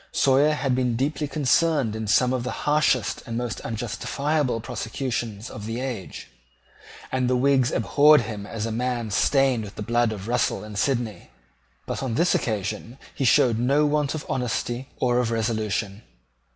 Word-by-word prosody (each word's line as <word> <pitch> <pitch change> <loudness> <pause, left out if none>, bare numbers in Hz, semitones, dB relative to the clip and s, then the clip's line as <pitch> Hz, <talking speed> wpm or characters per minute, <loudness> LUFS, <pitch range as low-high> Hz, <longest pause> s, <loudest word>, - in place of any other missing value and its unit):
Sawyer 140 +3 +3
had 140 -3 0
been 125 -2 +1
deeply 145 +4 -1
concerned 145 -4 +1
in 110 -1 -4
some 125 +4 +3
of 125 -2 -1
the 125 - -3 0.2
harshest 140 -7 +2
and 115 -1 -3
most 120 -2 -3
unjustifiable 120 +4 -2
prosecutions 115 -1 -4
of 105 0 -8
that 115 +2 -3
age; 125 -8 -5 0.8
and 130 -1 0
the 130 - +2
Whigs 130 -1 +3
abhorred 145 +8 +5
him 105 -3 -6
as 110 0 -4
a 115 - -3
man 120 -1 -2
stained 135 +1 +2
with 100 -1 -9
the 105 - -5
blood 120 +1 +1
of 100 -1 -6
Russell 120 -2 0
and 105 -1 -9
Sidney: 120 -4 -1 0.6
but - - -4
on 130 -4 -2
this 170 +7 +3
occasion 110 +2 -2 0.2
he 135 - -2
showed 125 -3 +4
no 140 +5 +3
want 150 0 0
of 155 - -6
honesty 125 +1 -2
or 125 -1 +2
of 120 -2 0
resolution. 110 -2 -2
125 Hz, 165 wpm, -24 LUFS, 110-135 Hz, 0.8 s, abhorred